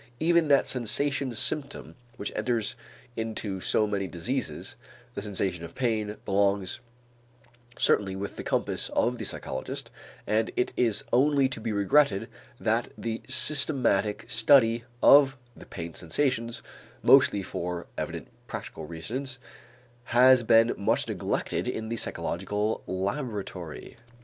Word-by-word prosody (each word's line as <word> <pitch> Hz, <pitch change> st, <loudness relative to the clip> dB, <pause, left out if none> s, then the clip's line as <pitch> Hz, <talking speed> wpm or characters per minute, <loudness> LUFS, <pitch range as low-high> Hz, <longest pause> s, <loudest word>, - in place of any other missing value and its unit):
Even 170 Hz, 0 st, +3 dB
that 140 Hz, -2 st, +4 dB
sensation 130 Hz, +3 st, 0 dB
symptom 140 Hz, +5 st, -2 dB, 0.2 s
which 100 Hz, -, -4 dB
enters 115 Hz, 0 st, 0 dB, 0.4 s
into 110 Hz, -3 st, -4 dB
so 110 Hz, -, +2 dB
many 100 Hz, -2 st, -2 dB
diseases, 90 Hz, -, -3 dB, 0.4 s
the -, -, -5 dB
sensation 95 Hz, -4 st, -2 dB
of 85 Hz, 0 st, -9 dB
pain, 110 Hz, -4 st, -1 dB
belongs 100 Hz, -1 st, +1 dB, 1.0 s
certainly 95 Hz, -2 st, +2 dB
within 100 Hz, +1 st, -6 dB
the -, -, -5 dB
compass -, -, -1 dB
of -, -, +1 dB
the -, -, -4 dB
psychologist -, -, -5 dB, 0.3 s
and 110 Hz, +1 st, +1 dB
it 125 Hz, -, 0 dB
is 115 Hz, -4 st, +2 dB
only 140 Hz, +1 st, +4 dB
to 130 Hz, -4 st, -5 dB
be 110 Hz, -, -3 dB
regretted 105 Hz, +1 st, +2 dB, 0.3 s
that -, -, 0 dB
the 115 Hz, -1 st, -4 dB
systematic 130 Hz, -5 st, +4 dB
study 115 Hz, -1 st, +4 dB, 0.2 s
of 140 Hz, -1 st, +7 dB, 0.2 s
the -, -, -14 dB
pain 85 Hz, 0 st, -7 dB
sensations, 115 Hz, -, -2 dB, 0.4 s
mostly 100 Hz, -, +5 dB
for 90 Hz, -1 st, -4 dB
evident -, -, -5 dB, 0.2 s
practical -, -, -7 dB
reasons, 125 Hz, -, -4 dB, 0.7 s
has 125 Hz, +1 st, +6 dB
been 115 Hz, 0 st, +4 dB
much 100 Hz, -, 0 dB
neglected -, -, -2 dB
in 110 Hz, 0 st, -4 dB
the 115 Hz, -, -2 dB
psychological 105 Hz, +3 st, -2 dB
laboratory. 95 Hz, -, -5 dB
110 Hz, 125 wpm, -27 LUFS, 100-130 Hz, 1.0 s, of